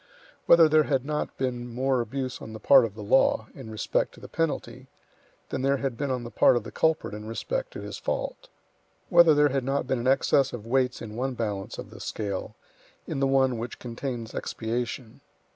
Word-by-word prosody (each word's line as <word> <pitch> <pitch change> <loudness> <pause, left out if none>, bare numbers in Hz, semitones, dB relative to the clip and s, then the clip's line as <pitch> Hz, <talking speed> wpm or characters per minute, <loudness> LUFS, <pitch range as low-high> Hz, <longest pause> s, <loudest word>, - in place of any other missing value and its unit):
Whether 170 -1 +8
there 155 -1 +4
had 135 -3 0
not 150 0 -3
been 125 -2 -2
more 130 +1 +1
abuse 130 +2 -4
on 110 - -8
the 110 - -7
part 130 +3 +6
of 105 -3 -7
the 105 - -7
law, 110 0 +3
in 110 - -10
respect 110 -1 -1
to - - -15
the - - -10
penalty, 165 -2 -3 0.6
than - - -3
there 140 +1 +2
had 135 -3 -2
been 140 +3 -3
on 125 -2 -2
the 120 - -8
part - - +5
of 120 - 0
the 115 - -9
culprit 160 -8 0
in 105 0 -7
respect - - -3
to - - -7
his - - -7
fault. - - -4 0.6
Whether 170 -4 +7
there 145 0 +5
had 135 -1 -1
not 135 +1 -1
been 130 -1 -1
an 120 - -2
excess 135 0 +3
of 115 -3 -6
weights 125 +1 0
in 110 -1 -8
one 130 +2 -2
balance 105 -4 -3
of - - -8
the - - -11
scale, 100 -3 -4 0.5
in - - -4
the 135 - +2
one 130 -3 +2
which 120 +2 -5
contains 120 -1 -5
expiation. 120 +2 -4
130 Hz, 210 wpm, -27 LUFS, 115-140 Hz, 0.6 s, Whether